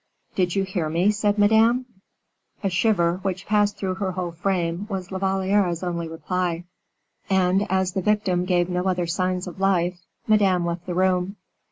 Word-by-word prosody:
"Did 180 Hz, -1 st, 0 dB
you 195 Hz, -, +2 dB
hear 185 Hz, -5 st, -2 dB
me?" 175 Hz, +6 st, +2 dB
said 210 Hz, 0 st, 0 dB
Madame. 220 Hz, +4 st, +4 dB, 0.8 s
A 195 Hz, -, 0 dB
shiver, 180 Hz, -3 st, +2 dB
which 190 Hz, -1 st, -3 dB
passed 205 Hz, -1 st, +2 dB
through 190 Hz, -2 st, -2 dB
her 190 Hz, -2 st, -1 dB
whole 180 Hz, -1 st, -3 dB
frame, 175 Hz, +1 st, -2 dB
was 190 Hz, -3 st, -4 dB
La 190 Hz, -, -3 dB
Valliere's 190 Hz, -2 st, +1 dB
only 170 Hz, -2 st, -2 dB
reply. 175 Hz, +1 st, -2 dB, 0.7 s
And 190 Hz, +1 st, +2 dB
as 190 Hz, -1 st, +1 dB
the 190 Hz, -, -2 dB
victim 190 Hz, -3 st, +1 dB
gave 175 Hz, -1 st, +2 dB
no 180 Hz, 0 st, -2 dB
other 180 Hz, -2 st, +1 dB
signs 185 Hz, +2 st, -1 dB
of 180 Hz, +1 st, -9 dB
life, 180 Hz, -2 st, +1 dB, 0.3 s
Madame 195 Hz, -5 st, +3 dB
left 170 Hz, +1 st, -4 dB
the 175 Hz, -, -3 dB
room. 185 Hz, +1 st, +1 dB
185 Hz, 170 wpm, -24 LUFS, 175-195 Hz, 0.8 s, Madame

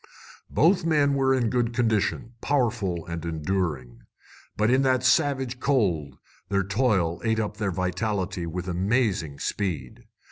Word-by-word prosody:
Both 170 Hz, +6 st, +3 dB
men 150 Hz, -4 st, +3 dB
were 135 Hz, -1 st, +2 dB
in 120 Hz, -4 st, 0 dB
good 120 Hz, -2 st, 0 dB
condition, 115 Hz, 0 st, 0 dB
powerful 110 Hz, -, 0 dB
and 85 Hz, -2 st, -5 dB
enduring. 80 Hz, -7 st, -3 dB, 0.6 s
But 105 Hz, +2 st, +2 dB
in 130 Hz, +1 st, +4 dB
that 130 Hz, -2 st, +2 dB
savage 135 Hz, -3 st, +2 dB
cold 100 Hz, -, 0 dB, 0.3 s
their 100 Hz, -1 st, +1 dB
toil 100 Hz, -5 st, +1 dB
ate 110 Hz, -1 st, +1 dB
up 105 Hz, -1 st, -3 dB
their 105 Hz, -3 st, -1 dB
vitality 95 Hz, 0 st, -2 dB
with 90 Hz, +2 st, -5 dB
amazing 95 Hz, -, 0 dB
speed. 80 Hz, -8 st, -4 dB
105 Hz, 135 wpm, -26 LUFS, 90-125 Hz, 0.6 s, in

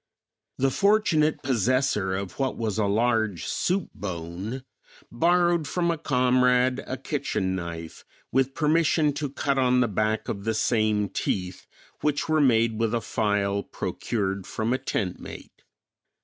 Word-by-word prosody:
The 135 Hz, 0 st, +2 dB
fortunate 180 Hz, -6 st, +2 dB
possessor 130 Hz, -5 st, +1 dB
of 100 Hz, +4 st, -6 dB
what 135 Hz, -1 st, -1 dB
was 110 Hz, -2 st, -2 dB
a 105 Hz, -, +2 dB
large 110 Hz, -2 st, +1 dB
soup 185 Hz, 0 st, -1 dB
bone 95 Hz, +6 st, -5 dB, 0.5 s
borrowed 175 Hz, +3 st, +2 dB
from 170 Hz, -1 st, 0 dB
a 165 Hz, -, -2 dB
comrade 125 Hz, -2 st, +2 dB
a -, -, -3 dB
kitchen 95 Hz, 0 st, -2 dB
knife 85 Hz, -2 st, -6 dB, 0.3 s
with 135 Hz, +1 st, +1 dB
permission 155 Hz, -1 st, +2 dB
to 145 Hz, 0 st, -3 dB
cut 140 Hz, 0 st, -1 dB
on 125 Hz, -1 st, +3 dB
the 125 Hz, -, +3 dB
back 110 Hz, +1 st, -1 dB
of 100 Hz, -3 st, -4 dB
the 110 Hz, +1 st, -1 dB
same 110 Hz, -2 st, +1 dB
teeth, 90 Hz, -1 st, -3 dB, 0.3 s
which 150 Hz, -1 st, 0 dB
were 155 Hz, -1 st, +3 dB
made 115 Hz, -4 st, +3 dB
with 115 Hz, 0 st, +1 dB
a -, -, +1 dB
file 100 Hz, -2 st, 0 dB
procured 100 Hz, -3 st, -3 dB
from 110 Hz, +3 st, -1 dB
a 130 Hz, -, 0 dB
tent 90 Hz, -4 st, -2 dB
mate. -, -, -11 dB
120 Hz, 145 wpm, -26 LUFS, 100-140 Hz, 0.5 s, on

